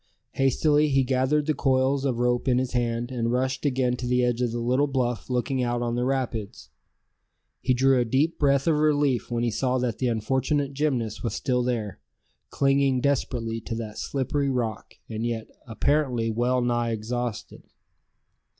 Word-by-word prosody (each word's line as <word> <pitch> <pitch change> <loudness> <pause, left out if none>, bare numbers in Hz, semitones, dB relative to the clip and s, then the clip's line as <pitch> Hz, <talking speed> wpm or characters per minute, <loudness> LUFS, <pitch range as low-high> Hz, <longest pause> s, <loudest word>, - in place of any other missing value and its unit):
Hastily 145 +3 +2
he 135 -1 +3
gathered 130 +3 +1
the 155 - +1
coils 135 0 +1
of 130 -4 0
rope 120 +1 0
in 125 -1 +3
his 130 0 -1
hand, 120 0 -1
and 115 -2 -1
rushed 130 +3 0
again 125 -2 +1
to 125 - -4
the 125 0 +2
edge 120 0 0
of 125 - +1
the 120 - -3
little 125 +5 +1
bluff 125 -4 -2
looking 130 +1 0
out 120 0 -1
on 120 -1 -1
the 120 +1 0
rapids. 125 -6 -3 0.9
He 130 - +2
drew 135 +1 +4
a 130 +5 +2
breath 140 -2 +3
of 160 -2 +3
relief 145 -4 +2
when 120 -1 -1
he 120 - +1
saw 130 +3 0
that 125 -3 -2
the 130 - +1
unfortunate 130 +5 0
gymnast 130 -7 -1
was 115 -2 -2
still 125 -1 0
there, 115 -7 -2 0.5
clinging 135 -1 +2
desperately 120 -4 -1
to 115 - -5
that 110 -2 -6
slippery 140 +1 -1
rock, 115 -5 -3
and 110 0 -4
yet 115 -2 -3 0.2
apparently 120 -1 0
well 125 +3 +1
nigh 120 -1 0
exhausted. 115 +1 -4
125 Hz, 170 wpm, -25 LUFS, 120-135 Hz, 0.9 s, drew